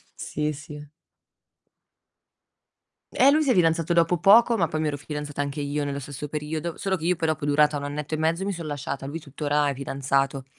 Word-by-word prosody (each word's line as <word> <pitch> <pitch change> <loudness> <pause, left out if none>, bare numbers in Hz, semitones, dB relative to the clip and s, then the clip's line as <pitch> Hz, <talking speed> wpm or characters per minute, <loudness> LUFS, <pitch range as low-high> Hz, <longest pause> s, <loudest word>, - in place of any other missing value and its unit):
Sì, 150 +1 -3
sì. 150 +1 -9 2.3
Eh, 270 - +5
lui 310 +1 +3
si 275 - +2
è - - +5
fidanzato 165 -2 +2
dopo 170 +1 +3
poco, 225 +6 +6
ma 170 -5 +2
poi 155 -1 -3
mi 155 - 0
ero 145 - -2
fidanzata 150 0 -5
anche 145 +1 -3
io 145 +1 -2
nello 140 0 -3
stesso 145 +1 -7
periodo. 155 +3 -4
Solo 195 -1 -1
che 160 - -6
io 180 +1 +2
poi 160 0 -1
dopo 155 -2 -1
è - - -1
durata 150 0 +3
1 140 - -6
annetto 145 +2 -4
e - - -4
mezzo, 165 +4 0
mi 200 - -1
sono 165 -3 -6
lasciata. 140 -1 -4
Lui 145 +4 -5
tuttora 145 0 -1
è - - -1
fidanzato. 135 0 -1
150 Hz, 210 wpm, -25 LUFS, 145-165 Hz, 2.3 s, poco